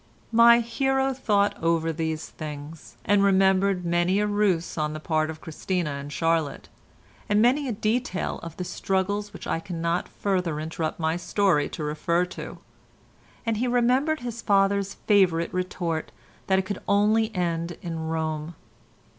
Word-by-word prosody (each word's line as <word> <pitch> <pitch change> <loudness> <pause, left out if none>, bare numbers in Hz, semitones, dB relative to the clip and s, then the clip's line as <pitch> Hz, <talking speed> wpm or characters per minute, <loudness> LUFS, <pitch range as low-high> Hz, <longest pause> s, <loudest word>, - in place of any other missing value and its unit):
My 235 +1 +7
hero 270 +3 0
thought 205 -6 +1
over 165 -1 +1
these 160 0 -3
things, 150 -3 -9
and 205 0 +4
remembered 190 -1 +3
many 175 +3 +2
a 210 - +2
ruse 205 -5 +1
on 150 -1 -1
the 155 - -5
part 155 0 0
of 160 0 -7
Christina 170 0 -2
and 140 +1 -6
Charlotte, 165 0 -1 0.6
and 205 0 +3
many 260 +5 +3
a - - -1
detail 220 -1 -1
of 165 -1 -9
the 180 - -3
struggle 190 +2 -1
which 205 -1 -11
I - - -1
cannot 170 0 -2
further 180 -6 -1
interrupt 160 +1 -3
my 160 +1 0
story 175 -5 +1
to 160 - -6
refer 160 +4 0
to, - - -7 0.9
and 225 -2 0
he 250 +3 0
remembered 250 +5 +2
his 235 -1 -5
father's 200 -1 +2
favourite 180 -5 +2
retort 180 -3 -2 0.4
that 190 - +3
it 190 - +2
could 200 0 -4
only 215 +2 +3
end 170 -1 -2
in 165 -2 -4
Rome. 160 0 -3
180 Hz, 155 wpm, -25 LUFS, 165-205 Hz, 0.9 s, My